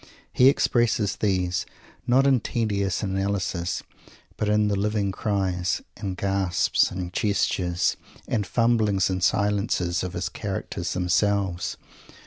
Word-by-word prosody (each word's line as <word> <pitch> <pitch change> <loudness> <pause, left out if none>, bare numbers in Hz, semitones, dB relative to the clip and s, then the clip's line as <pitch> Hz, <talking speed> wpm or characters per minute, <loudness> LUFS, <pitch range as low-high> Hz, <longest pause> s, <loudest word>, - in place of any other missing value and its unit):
He 130 +1 +6
expresses 115 -7 +1
these, 90 -3 0 0.4
not 130 +3 +4
in 135 -2 +4
tedious 100 -5 -1
analysis, 95 -3 -2 0.5
but 105 - -1
in 105 0 +3
the 100 - +1
living 100 0 0
cries, 95 -3 -1
and 95 -3 -5
gasps, 95 -2 +1
and 90 -1 -5
gestures, 90 -4 0 0.3
and 105 -4 -1
fumblings 110 -5 +2
and 95 -1 -2
silences 100 -3 +1
of 90 -1 -4
his 90 +1 -2
characters 95 -3 -4
themselves. 90 0 0
100 Hz, 115 wpm, -25 LUFS, 90-105 Hz, 0.5 s, He